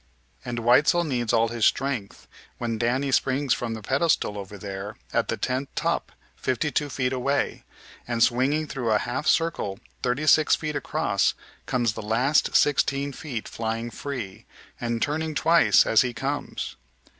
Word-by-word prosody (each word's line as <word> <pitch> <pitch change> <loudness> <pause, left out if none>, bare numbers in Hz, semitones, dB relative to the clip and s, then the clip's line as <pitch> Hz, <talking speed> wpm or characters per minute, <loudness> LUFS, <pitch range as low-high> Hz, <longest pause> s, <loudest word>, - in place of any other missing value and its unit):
And 120 -1 -4
Weitzel 125 +9 +4
needs 125 -7 -1
all 115 0 +3
his 115 -1 -3
strength 130 -5 0 0.3
when 115 -2 -3
Danny 130 +4 0
springs 135 0 +2
from 115 -2 -3
the 110 - -9
pedestal 135 -4 +1
over 100 0 -7
there 100 +1 -6 0.2
at - - +1
the - - -2
tent 130 +2 -2
top - - -1 0.2
fifty 130 +4 -1
two 145 0 0
feet 130 -1 -1
away, 135 +2 -1 0.4
and, 120 -1 +2
swinging 135 +6 +2
through 135 -5 -3
a 105 - +5
half 125 +7 -3
circle 165 -12 +1 0.2
thirty 125 +5 0
six 155 +1 +5
feet 155 -1 -4
across, - - 0 0.3
comes 120 -4 +1
the - - -6
last 120 +8 +1
sixteen 140 -1 +2
feet 130 -6 -6
flying 115 +1 -3
free, 115 -5 -6 0.3
and 120 -1 -1
turning 155 +1 -2
twice 165 +4 +5
as 110 - +5
he 125 -2 -2
comes. 140 +5 -4
125 Hz, 155 wpm, -25 LUFS, 115-140 Hz, 0.4 s, a